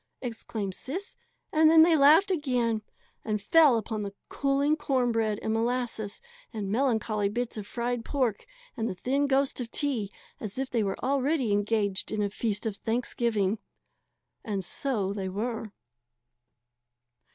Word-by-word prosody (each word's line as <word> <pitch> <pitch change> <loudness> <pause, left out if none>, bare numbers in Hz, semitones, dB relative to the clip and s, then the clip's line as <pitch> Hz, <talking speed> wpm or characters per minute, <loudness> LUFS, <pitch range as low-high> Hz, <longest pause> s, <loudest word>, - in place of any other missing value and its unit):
exclaimed 220 -5 -4
Sis. 355 - -5 0.4
And 315 0 +6
then 320 0 +8
they 330 0 +5
laughed 315 +7 +6
again, 250 -9 0 0.4
and 215 -1 -1
fell 290 +3 +5
upon 220 -1 -3
the 200 -1 -5
cooling 280 +2 +1
corn 260 -5 +1
bread 220 -2 0
and 220 - 0
molasses 230 -2 -2 0.3
and 205 -4 -4
melancholy 220 -4 +1
bits 240 +3 -3
of 210 -2 -6
fried 240 0 -2
pork 250 -7 -1 0.3
and 230 -2 -1
the - - -4
thin 275 +9 0
ghost 270 -1 +1
of 235 - -5
tea 245 -8 -1 0.3
as 210 0 -6
if 265 0 -3
they 235 - +1
were 195 -1 -2
already 275 -2 +1
engaged 205 -1 0
in 210 -1 0
a 200 - -1
feast 210 -1 -2
of 215 -3 -2
Thanksgiving. 225 -3 0 0.8
And 200 -4 -3
so 210 -5 -1
they 195 -2 -3
were. 220 +2 -3
230 Hz, 150 wpm, -28 LUFS, 210-270 Hz, 0.8 s, then